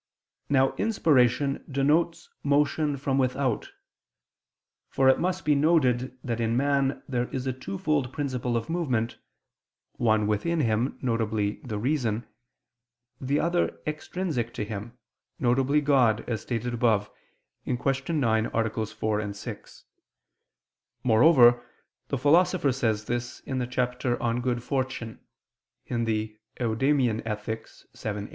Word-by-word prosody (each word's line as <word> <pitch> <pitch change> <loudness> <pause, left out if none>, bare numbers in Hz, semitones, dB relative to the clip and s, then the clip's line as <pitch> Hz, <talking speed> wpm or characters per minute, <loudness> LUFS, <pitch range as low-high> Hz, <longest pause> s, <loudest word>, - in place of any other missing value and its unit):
Now 135 -1 +3
inspiration 140 - +2
denotes 155 +5 +1
motion 145 +1 +1
from 135 0 0
without. 130 -2 0 1.2
For 135 -1 +2
it 130 - +5
must 180 -3 -1
be 150 - +4
noted 130 -5 +2
that 120 -2 -2
in 115 0 +1
man 140 0 +1
there 125 -2 -1
is 130 -1 -4
a 130 - -1
twofold 130 +4 -2
principle 130 -5 -2
of 115 - -4
movement, 130 -9 -1 0.8
one 110 -2 +2
within 130 +11 0
him, 115 +1 0
viz. 110 -4 0
the 110 -5 -4
reason; 120 -2 -1 1.0
the 140 +3 +1
other 175 +1 0
extrinsic 150 -5 -3
to 105 - -2
him, 110 +3 -7 0.4
viz. 135 +4 +2
God, 125 -6 +3
as 110 -4 -2
stated 120 0 -3
above 110 -4 +1 0.5
(Q. 125 - -1 0.4
9, 115 -6 +2
AA. 115 -1 0 0.2
4, 105 -1 -2
6): 100 - -9 1.2
moreover 120 0 +6 0.4
the 140 - -1
Philosopher 165 +2 +3
says 110 -4 -1
this 120 +1 -4
in 130 -2 -3
the 125 - -2
chapter 125 0 -1
On 120 +1 0
Good 120 -1 -1
Fortune 130 -5 -3 0.7
(Ethic. 110 -2 -1 0.2
Eudem. 120 0 +1
125 Hz, 115 wpm, -27 LUFS, 115-140 Hz, 1.2 s, moreover